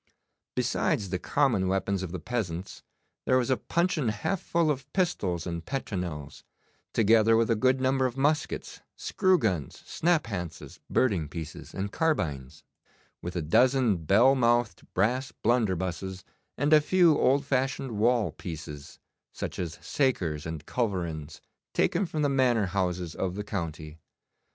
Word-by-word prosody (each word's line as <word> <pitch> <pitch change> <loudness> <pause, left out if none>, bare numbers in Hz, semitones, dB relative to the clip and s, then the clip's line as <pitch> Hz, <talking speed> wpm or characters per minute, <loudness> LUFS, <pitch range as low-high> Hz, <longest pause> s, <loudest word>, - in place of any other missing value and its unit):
Besides 125 - 0
the 90 - -1
common 120 -7 +1
weapons 95 0 0
of 95 -3 -5
the 90 - -3
peasants 90 -2 -4 0.5
there 130 - +4
was 130 +1 +1
a 130 - +3
puncheon 170 -7 0
half 110 - -2
full 165 -2 +1
of 135 0 -5
pistols 100 - 0
and 85 -1 -4
petronels, 90 - -5 0.5
together 115 +1 +4
with 115 0 +2
a - - +4
good 130 +4 +2
number 130 0 +2
of 125 +1 -7
muskets, 150 +3 -1
screw 185 -2 +2
guns, 90 - -2
snaphances, 115 - -2
birding 95 - +1
pieces, 80 0 -7
and 100 +1 -3
carbines, 80 - -1 0.6
with 85 +1 -6
a 85 - -1
dozen 125 - +3
bell 100 - +4
mouthed 120 -6 +1
brass 125 +8 +1
blunderbusses, 95 -5 0 0.3
and 145 +4 +2
a 155 - +8
few 175 0 +4
old 140 +2 +3
fashioned 135 -1 -1
wall 110 -3 +2
pieces, 75 -4 -8 0.3
such - - -5
as 85 -3 -4
sakers 85 - 0
and 80 -2 -6
culverins 85 -10 -3 0.3
taken 185 +2 +2
from 155 -2 -2
the - - +4
manor 130 -6 +2
houses 90 -3 -2
of 95 -1 -3
the 105 - -3
county. 80 -6 -5
110 Hz, 140 wpm, -28 LUFS, 90-130 Hz, 0.6 s, a